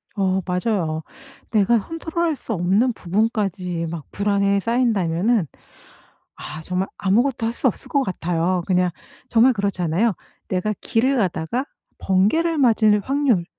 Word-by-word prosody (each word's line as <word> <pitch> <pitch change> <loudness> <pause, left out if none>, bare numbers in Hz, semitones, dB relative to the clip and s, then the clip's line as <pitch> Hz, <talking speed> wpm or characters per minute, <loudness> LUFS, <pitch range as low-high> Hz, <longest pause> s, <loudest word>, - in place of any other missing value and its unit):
어 190 -2 +1
맞아요. 180 -4 -1 0.5
내가 220 +2 +4
컨트롤 330 - -4
할 320 -2 0
수 235 - -5
없는 200 +7 +2
부분까지 190 -4 -1
막 160 -3 -6
불안에 200 -1 +1
싸인다면은 215 -4 +1 0.9
아 155 +2 -8
정말 185 +3 -2
아무것도 230 +5 +1
할 230 - -2
수 260 - +1
없을 230 - -4
것 280 -1 +2
같아요. 175 -3 -1
그냥 180 -1 +2 0.4
정말 240 +3 +5
그렇잖아요. 200 0 0 0.4
내가 190 +3 0
길을 260 +4 +1
가다가 195 - -1 0.3
번개를 220 - +2
맞을 220 -5 +4
확률 265 -9 +1
200 Hz, 285 characters per minute, -22 LUFS, 180-235 Hz, 0.9 s, 정말